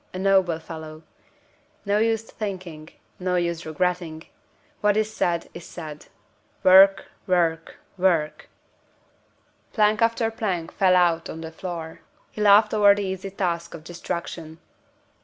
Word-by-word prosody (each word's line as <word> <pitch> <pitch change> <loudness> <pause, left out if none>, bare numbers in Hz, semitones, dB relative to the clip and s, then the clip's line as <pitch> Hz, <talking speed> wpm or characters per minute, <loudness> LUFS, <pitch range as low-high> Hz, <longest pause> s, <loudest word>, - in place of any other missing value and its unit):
a - - -3
noble 190 -3 +2
fellow! 160 -1 -9 0.8
No 200 +1 +2
use 225 0 +1
thinking, 185 -8 -7 0.3
no 180 0 -1
use 170 -2 -2
regretting; 170 -1 -2 0.6
what 210 0 +2
is 215 0 0
said, 170 -4 0
is 170 - -9
said. 155 -4 -9 0.6
Work! 195 +1 +7 0.2
work! 165 -3 0 0.2
work!" 160 -5 0 1.2
Plank 210 0 +2
after 230 0 +1
plank 190 -7 -3
fell 185 -2 +3
out 170 -2 +2
on 160 - -7
the 160 0 -7
floor. 165 -2 -7 0.3
He 215 - -7
laughed 210 +1 +5
over 205 -1 +6
the 205 - -3
easy 190 +1 -4
task 170 -3 -3
of 155 - -11
destruction. 170 -1 -6
180 Hz, 130 wpm, -24 LUFS, 165-200 Hz, 1.2 s, Work